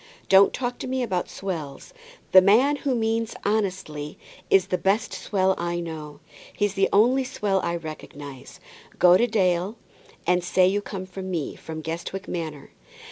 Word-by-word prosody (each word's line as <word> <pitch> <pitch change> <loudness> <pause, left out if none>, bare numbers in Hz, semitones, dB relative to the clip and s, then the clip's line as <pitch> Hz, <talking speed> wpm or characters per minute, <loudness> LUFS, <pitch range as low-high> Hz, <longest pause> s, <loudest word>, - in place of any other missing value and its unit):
Don't 195 +1 +7
talk 245 -1 -3
to - - -5
me 260 0 -1
about 185 -7 -2
swells. 160 -8 -6 0.4
The 185 - +9
man 245 +10 +4
who 270 -2 -1
means 225 0 -1
honestly 185 -8 -2 0.3
is 195 -2 +5
the 180 - 0
best 200 +4 +1
swell 190 -2 +1
I 175 0 -2
know. 155 -3 -7 0.4
He's 205 -2 +1
the 195 -1 +2
only 245 +6 +4
swell 205 -7 -1
I 170 0 -1
recognize. 145 -4 -9 0.4
Go 180 0 +7
to 235 - +4
old 240 - -7
Dale, 185 0 +1 0.5
and 180 0 +2
say 185 +1 +3
you 200 +3 +2
come 195 -2 -6
from 190 0 -7
me, 165 -6 -3
from 160 -1 -7
Guestwick 170 +4 -5
Manor. 155 -4 -5
185 Hz, 165 wpm, -25 LUFS, 170-210 Hz, 0.5 s, The